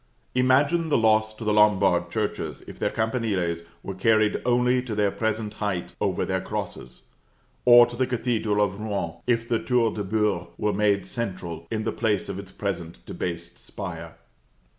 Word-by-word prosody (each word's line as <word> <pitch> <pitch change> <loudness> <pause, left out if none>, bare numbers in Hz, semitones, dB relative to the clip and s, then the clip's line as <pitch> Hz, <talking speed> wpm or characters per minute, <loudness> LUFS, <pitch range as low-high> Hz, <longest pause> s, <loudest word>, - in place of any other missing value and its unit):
Imagine 140 +6 +3
the - - +3
loss 110 -1 +3
to 115 - -8
the 105 -1 +1
Lombard 95 -4 +4
churches 105 +1 -3
if - - -11
their - - +1
campaniles 110 -7 -1 0.2
were 95 - -5
carried 110 +2 +2
only 125 +1 +3
to 120 -4 -5
their 105 -1 +2
present 110 -1 -2
height 100 -4 -2
over - - 0
their - - -1
crosses; - - -6 0.6
or 120 -1 +9
to 120 0 -8
the 130 +1 0
Cathedral 115 -4 +1
of 100 0 -6
Rouen, 100 -6 -3
if 115 -1 +1
the 115 -1 +1
Tour 120 -3 +1
de 105 - -3
Beurre 100 -3 0
were 105 -1 0
made 100 -1 +2
central, 90 -7 -5
in 110 -1 -2
the - - -1
place 105 -4 0
of 100 -1 -4
its 100 -1 -9
present 85 -10 -5
debased 85 -1 -5
spire! - - -7
105 Hz, 170 wpm, -25 LUFS, 95-115 Hz, 0.6 s, or